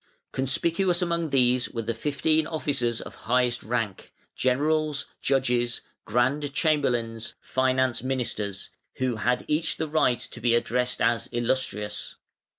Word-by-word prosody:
Conspicuous 170 +7 +1
among 170 -2 0
these 125 -2 +3
were 115 -2 -4
the 115 +2 -1
fifteen 150 +5 +1
officers 135 -8 -1
of - - -9
highest 125 0 +1
rank, 115 -4 -3 0.2
Generals, 150 +3 +1 0.2
Judges, 125 -3 +1 0.2
Grand 130 +6 +1
Chamberlains, 120 -9 0
Finance 130 -1 +1
Ministers, 115 -6 -3 0.2
who 130 -3 -1
had 125 +3 0
each 155 +2 0
the 160 - -1
right 150 -5 +3
to 120 - -7
be 120 0 +3
addressed 125 +1 0
as 120 - +2
"Illustrious". 120 -4 -2
125 Hz, 125 wpm, -26 LUFS, 120-150 Hz, 0.2 s, these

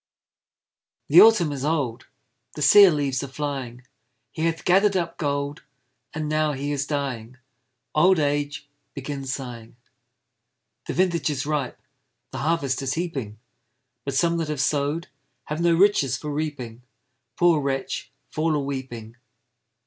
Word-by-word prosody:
The - - +9
Autumn 215 -9 +6
is 135 -2 -5
old, 140 -6 -1 0.5
The 150 - -3
sere 195 +8 +8
leaves 140 -5 -1
are - - -4
flying; 130 -3 -5 0.5
He 160 +1 -1
hath 165 0 -3
gather'd 195 +2 +4
up 170 -2 -3
gold, 145 -1 -2 0.5
And 155 -1 -4
now 155 0 +1
he 140 +1 -3
is 145 0 -2
dying; 130 -5 -4 0.6
Old 180 +4 +5
Age, 145 -1 -1 0.3
begin 140 0 -5
sighing! 125 -3 -6 1.1
The - - -2
vintage 170 -4 +1
is 140 -2 -2
ripe, 145 -4 -2 0.5
The - - -5
harvest 145 -4 0
is 135 -1 -2
heaping; 140 -11 -4 0.7
But 140 -1 -4
some 170 +3 +2
that 165 -2 -2
have 150 -2 -3
sow'd 145 +4 0 0.4
Have 150 +4 -4
no 170 -1 +4
riches 165 - +3
for 150 -1 -5
reaping; 140 -6 -4 0.6
Poor 170 -3 +4
wretch, 135 -1 -3 0.2
fall 155 0 0
a - - +1
weeping! 130 -5 -6
145 Hz, 140 wpm, -24 LUFS, 135-160 Hz, 1.1 s, The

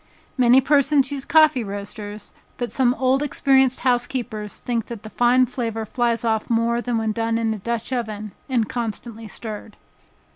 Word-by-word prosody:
Many 250 0 +5
persons 280 0 +3
use 275 -1 -4
coffee 310 -6 +4
roasters, 205 +1 -7 0.2
but 245 -1 -3
some 255 -2 +2
old 260 +1 +2
experienced 265 -3 +2
housekeepers 240 -4 -1
think 235 -3 -3
that 230 -3 -8
the 215 - -9
fine 245 +1 +4
flavor 230 -3 -3
flies 235 0 0
off 220 -1 0
more 235 +1 +1
than 240 -1 -1
when 220 -1 0
done 225 +1 -1
in 225 -1 0
a 215 - -6
dutch 235 +4 -3
oven, 215 -4 -4 0.2
and 235 -5 +1
constantly 230 -1 -5
stirred. 215 0 -8
235 Hz, 160 wpm, -22 LUFS, 220-255 Hz, 0.2 s, Many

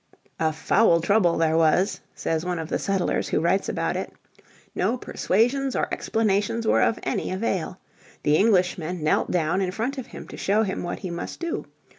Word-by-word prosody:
"A 160 -1 +2
foul 170 +3 +3
trouble 175 0 +3
there 160 -1 +2
was," 165 +5 +3 0.2
says 160 0 -1
one 180 -1 -2
of 160 -1 -5
the - - -1
settlers 195 -2 0
who - - +1
writes 170 +5 +1
about - - -1
it. - - -4 0.6
No 250 - 0
persuasions 250 +5 0
or - - +1
explanations 220 +1 0
were - - +3
of 230 - +2
any - - -2
avail. 185 -2 -2 0.5
The 150 +1 +3
Englishmen 180 -5 +1
knelt 155 - +2
down 175 +2 +1
in 185 - 0
front 235 +8 -3
of 255 - -7
him - - -10
to - - -9
show 210 +3 +2
him 195 -3 -3
what 175 - -4
he 185 - -4
must 170 - -6
do. 335 0 -3
185 Hz, 185 wpm, -24 LUFS, 170-220 Hz, 0.6 s, foul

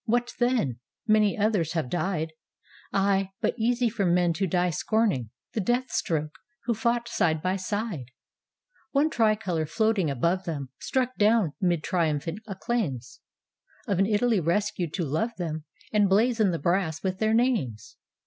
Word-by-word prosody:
What 240 +2 0
then? 240 - +1 0.3
many 215 -2 +3
others 200 -7 +1
have 160 -6 -1
died. 165 0 -2 0.6
Ay, 195 -1 +2
but - - +1
easy 240 +1 +1
for 225 -2 -1
men 175 -1 +3
to 195 +3 -1
die 180 0 +1
scorning 195 - 0 0.2
The 220 - 0
death 245 +5 0
stroke, 155 -2 -1 0.3
who 235 - +2
fought 235 +2 0
side 160 -7 +1
by 185 +1 +1
side; 205 - -3 0.9
One 295 +3 +3
tricolor 215 - +1
floating 215 -2 +1
above 170 +8 0
them; 145 -6 -4
Struck 255 -1 -1
down 210 -6 +3
'mid 175 -4 +1
triumphant 165 0 -1
acclaims 190 - -3 0.7
Of 195 -3 0
an 195 - +4
Italy 220 0 +2
rescued 175 0 0
to 175 - -1
love 215 - -1
them 160 -4 -4 0.3
And 205 -2 +4
blazon 220 +1 +3
the 170 - 0
brass 165 0 0
with 190 0 -2
their 220 0 +2
names. 135 - 0
195 Hz, 150 wpm, -27 LUFS, 165-225 Hz, 0.9 s, an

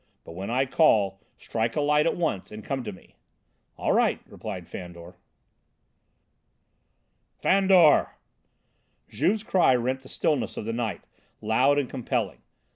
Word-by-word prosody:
But - - -11
when 95 +4 -6
I 130 +3 +1
call, 105 - +2 0.2
strike 115 0 -2
a 150 - +1
light 150 +2 +3
at - - 0
once 160 - -2
and 105 0 -9
come 135 -2 -3
to 105 - -4
me." 95 - -17 0.6
"All - - 0
right," - - +2
replied 95 -6 -8
Fandor. 85 -1 -9 2.2
"Fandor!" 190 -5 +4 0.9
Juve's 210 +2 0
cry 180 -11 +3
rent 125 +2 -1
the 130 - -16
stillness 150 -4 -1
of - - -4
the 115 - -3
night, 115 -6 -3 0.4
loud 130 +6 +2
and 140 -3 0
compelling. 125 -2 -3
125 Hz, 135 wpm, -26 LUFS, 105-150 Hz, 2.2 s, Fandor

